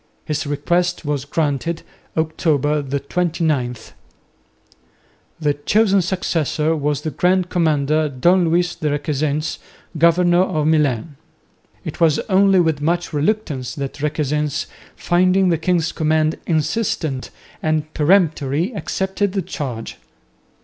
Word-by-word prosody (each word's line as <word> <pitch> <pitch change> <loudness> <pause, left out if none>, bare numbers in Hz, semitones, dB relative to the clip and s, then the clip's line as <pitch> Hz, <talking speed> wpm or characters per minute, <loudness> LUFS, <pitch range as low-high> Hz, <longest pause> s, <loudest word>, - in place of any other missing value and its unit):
His 150 0 -2
request 175 +5 0
was 145 -2 -2
granted, 155 +2 -1 0.3
October 150 -2 +1
29. 140 -1 -1 1.6
The 150 -2 +1
chosen 200 +7 +2
successor 165 -3 0
was 145 -2 -1
the 155 - -3
Grand 180 +4 +1
Commander, 155 -2 +1
Don 175 +7 +3
Luis 175 +1 +1
de 155 -3 -2
Requesens, 145 +1 -1 0.4
governor 175 +2 +4
of 155 -5 0
Milan. 150 -2 +1 0.7
It - - -6
was 160 -3 +4
only 195 0 +5
with 160 -4 +1
much 170 +2 -1
reluctance 150 - -1
that 140 0 -5
Requesens, 150 -1 -1 0.3
finding 185 +2 +2
the 165 -3 +1
king's 165 -1 +1
command 155 0 +1
insistent 155 - -1 0.3
and 155 0 -1
peremptory, 160 - +2
accepted 190 -1 -2
the 195 -2 -1
charge. 125 -8 -5
155 Hz, 110 wpm, -20 LUFS, 145-175 Hz, 1.6 s, only